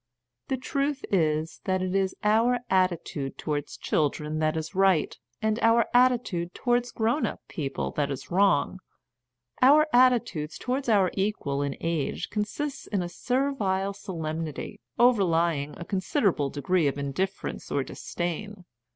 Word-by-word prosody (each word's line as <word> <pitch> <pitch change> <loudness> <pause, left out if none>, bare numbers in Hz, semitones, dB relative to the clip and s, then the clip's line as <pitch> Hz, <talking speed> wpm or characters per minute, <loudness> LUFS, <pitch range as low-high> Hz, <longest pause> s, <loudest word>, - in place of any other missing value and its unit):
The 265 - -1
truth 275 +2 -2
is 160 -3 0
that 185 -1 0
it 185 0 -2
is 195 -1 +1
our 225 +4 +3
attitude 175 -7 0
towards 145 -1 -3
children 150 +1 -1
that 155 +1 +1
is 160 +2 -4
right, 190 -4 +3 0.3
and 220 +1 +1
our 230 0 +4
attitude 245 -9 +2
towards 245 0 +1
grown 235 +7 +1
up - - -6
people 135 - -3
that 145 -1 -1
is 140 +4 -6
wrong. 190 -2 +2 0.8
Our 290 +4 +7
attitude 240 -11 +3
towards 255 +1 -2
our 195 -5 +4
equals 145 -9 -1
in 140 - -5
age 165 -4 -2
con 210 -1 0
sists 290 +6 -5
in 195 -4 -1
a 175 - -4
servile 205 -6 0
solemnity, 160 0 -5 0.2
overlying 170 - +2
a 170 - -7
con 195 - -1
siderable 180 - +1
degree 155 +3 +1
of 140 - -1
indifference 165 +8 -3
or 140 - +1
disdain. 180 +7 -5
190 Hz, 140 wpm, -27 LUFS, 155-230 Hz, 0.8 s, Our